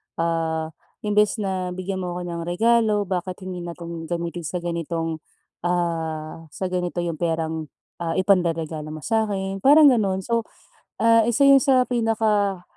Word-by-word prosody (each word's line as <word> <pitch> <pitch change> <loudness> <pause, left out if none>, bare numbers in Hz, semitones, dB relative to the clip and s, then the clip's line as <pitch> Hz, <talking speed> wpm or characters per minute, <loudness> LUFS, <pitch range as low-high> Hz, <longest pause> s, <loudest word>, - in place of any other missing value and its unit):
ah, 165 -1 -1 0.3
"Imbes 210 0 +2
na 185 -2 -2
bigyan 190 +1 -4
mo 180 -1 -4
ako 180 - -4
ng 170 -1 -4
regalo, 215 +2 +2
bakit 185 0 -4
hindi 185 -1 -5
na 170 -1 -6
'tong 170 -1 -7
gamitin 170 -1 -4
sa 175 +2 -4
ganitong, 165 -1 -3 0.5
ah, 165 -2 -2
sa 180 +5 -5
ganito 180 -1 -2
'yong 165 -3 -3
perang, 160 -2 -2 0.3
ah, 165 -1 -2
ipanreregalo 165 -5 +1
mo 155 - -9
sa'kin" 200 -4 -1
parang 290 +5 +7
gano'n. 195 -5 +1
So, 230 +2 -1 0.6
ah, 230 -1 +5
isa 240 +4 +2
'yon 275 0 +8
sa 265 -2 +4
pinaka, 220 -5 +1
180 Hz, 150 wpm, -23 LUFS, 165-210 Hz, 0.6 s, yon